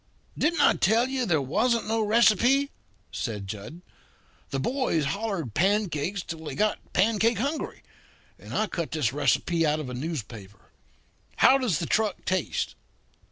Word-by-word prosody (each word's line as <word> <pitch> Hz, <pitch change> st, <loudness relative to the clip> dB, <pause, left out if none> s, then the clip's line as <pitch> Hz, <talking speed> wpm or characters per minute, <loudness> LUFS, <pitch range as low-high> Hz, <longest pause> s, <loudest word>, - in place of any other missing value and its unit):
"Didn't 335 Hz, +3 st, +1 dB
I -, -, +6 dB
tell 230 Hz, +5 st, +2 dB
you 260 Hz, -3 st, -1 dB
there 160 Hz, -5 st, +2 dB
wasn't 225 Hz, -, +1 dB
no 225 Hz, +1 st, +1 dB
receipt?" 235 Hz, +5 st, +3 dB, 0.4 s
said 105 Hz, -5 st, -4 dB
Jud. 105 Hz, -, -8 dB, 0.7 s
"The 135 Hz, -, -2 dB
boys 205 Hz, -, 0 dB
hollered 190 Hz, -, -3 dB
pancakes 190 Hz, -, 0 dB
till 160 Hz, -1 st, -7 dB
they 155 Hz, -, -6 dB
got 215 Hz, 0 st, +1 dB
pancake 220 Hz, +3 st, +2 dB
hungry, 280 Hz, +8 st, -3 dB, 0.6 s
and -, -, -12 dB
I 215 Hz, -, +1 dB
cut 170 Hz, -5 st, -4 dB
this 145 Hz, -7 st, -1 dB
recipe 165 Hz, +3 st, +1 dB
out 155 Hz, 0 st, +1 dB
of 135 Hz, -5 st, -5 dB
a -, -, -6 dB
newspaper. 115 Hz, -, -7 dB, 0.6 s
How 270 Hz, -, +5 dB
does 230 Hz, -, +1 dB
the 170 Hz, -, -3 dB
truck 215 Hz, +2 st, 0 dB
taste?" 185 Hz, -3 st, -1 dB
185 Hz, 150 wpm, -26 LUFS, 150-225 Hz, 0.7 s, I